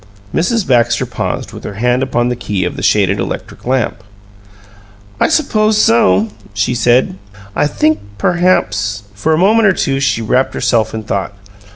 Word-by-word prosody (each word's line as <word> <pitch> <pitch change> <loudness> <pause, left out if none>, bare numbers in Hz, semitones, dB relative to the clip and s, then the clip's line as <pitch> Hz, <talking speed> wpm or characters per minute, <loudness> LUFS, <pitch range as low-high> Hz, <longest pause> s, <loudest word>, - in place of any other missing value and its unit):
Mrs. 215 +5 0
Baxter 120 -2 +2
paused, - - -4
with - - -10
her 100 - -6
hand 125 +4 +1
upon 120 -2 0
the 125 - -1
key 105 -6 -2
of 90 - -3
the - - -6
shaded 100 -2 +2
electric - - -6
lamp. 125 -3 -1 1.2
"I - - +3
suppose 215 -8 +2
so," 110 - +3 0.3
she 105 +4 0
said. 120 -4 +2 0.4
"I 145 - +2
think 155 +1 +1 0.2
perhaps 105 - +1
" - - -29
For 105 +10 -1
a 155 - +3
moment 215 +5 +4
or 190 - +4
two 135 -5 -1
she 135 -4 0
wrapped 130 +4 +1
herself 110 -2 0
in 110 - -5
thought. 100 -1 -3
120 Hz, 170 wpm, -15 LUFS, 105-155 Hz, 1.2 s, moment